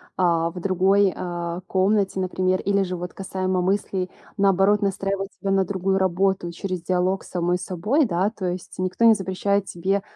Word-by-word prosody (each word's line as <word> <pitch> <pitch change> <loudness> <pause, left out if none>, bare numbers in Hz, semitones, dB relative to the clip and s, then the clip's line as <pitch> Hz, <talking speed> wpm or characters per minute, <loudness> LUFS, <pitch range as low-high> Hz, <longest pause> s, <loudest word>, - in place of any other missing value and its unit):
а, 170 -2 +2
в 180 +1 -8
другой, 195 +1 +3
а, 175 -1 -4
комнате, 195 0 +1
например, 185 0 0
или 200 0 +1
же 185 -1 -2
вот 180 0 -6
касаемо 185 -1 -2
мыслей, 190 -1 -1 0.3
наоборот, 195 +1 +3
настраивать 195 0 -1
себя 195 - -1
на 195 0 +3
другую 190 0 0
работу 190 -1 +1
через 185 0 -4
диалог 185 +2 0
с - - -13
самой 175 0 0
собой, 210 - +1
да. 190 0 0
То 200 -5 -6
есть 180 +1 -6
никто 185 +5 +1
не 225 - +8
запрещает 200 0 0
тебе 190 +3 -1
190 Hz, 170 wpm, -23 LUFS, 180-195 Hz, 0.3 s, не